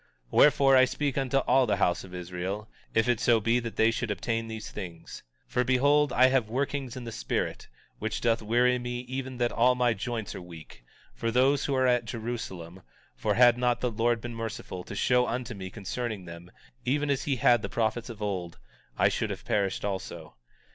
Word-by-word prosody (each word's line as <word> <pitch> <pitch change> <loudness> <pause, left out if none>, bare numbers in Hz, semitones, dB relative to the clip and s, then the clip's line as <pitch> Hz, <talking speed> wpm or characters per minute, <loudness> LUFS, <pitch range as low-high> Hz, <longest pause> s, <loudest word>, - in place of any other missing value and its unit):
19:19 - - -35 0.2
Wherefore, 140 -2 +5
I 130 - +7
speak 140 +1 -2
unto 135 -1 0
all 130 -1 +3
the 105 - +2
house 90 -2 +1
of 95 - -12
Israel, 90 +4 -5 0.3
if 115 +1 +3
it 120 -2 +2
so 120 -2 +4
be 115 +3 +2
that 115 -2 -6
they 110 +1 +4
should 115 0 -3
obtain 115 +3 -2
these 110 -1 -7
things. 90 -5 -8 0.3
19:20 - - -27
For 125 - +2
behold, 140 +3 +3
I 130 - +6
have 130 -5 +1
workings 135 0 -2
in 125 - -6
the 115 - -6
spirit, - - -3 0.3
which 110 0 -2
doth 115 -1 +1
weary 120 +3 +2
me 120 0 -4
even 130 +1 -5
that 120 -1 +1
all 125 +2 +3
my 125 -1 +2
joints 110 0 -4
are - - -7
weak, 80 -8 -12 0.3
for 115 - -2
those 130 +4 +3
who 140 - 0
are 130 0 +2
at 125 -2 +2
Jerusalem; 110 -7 -6 0.3
for - - 0
had 120 0 +6
not 125 -1 +1
the 125 - 0
Lord 115 +1 +1
been 120 +1 -6
merciful, 110 -5 -6
to - - -7
show 125 +3 +2
unto 120 +1 -3
me 95 -3 -7
concerning 110 0 -5
them, 85 +1 -10 0.3
even 145 +3 0
as 135 - -1
he 140 - +1
had 120 -1 +4
prophets 115 +1 -1
of 110 -3 -7
old, 90 -4 -3 0.4
I - - +4
should - - -1
have - - -6
perished 100 -2 0
also. 95 -2 -5
120 Hz, 205 wpm, -28 LUFS, 105-125 Hz, 0.4 s, I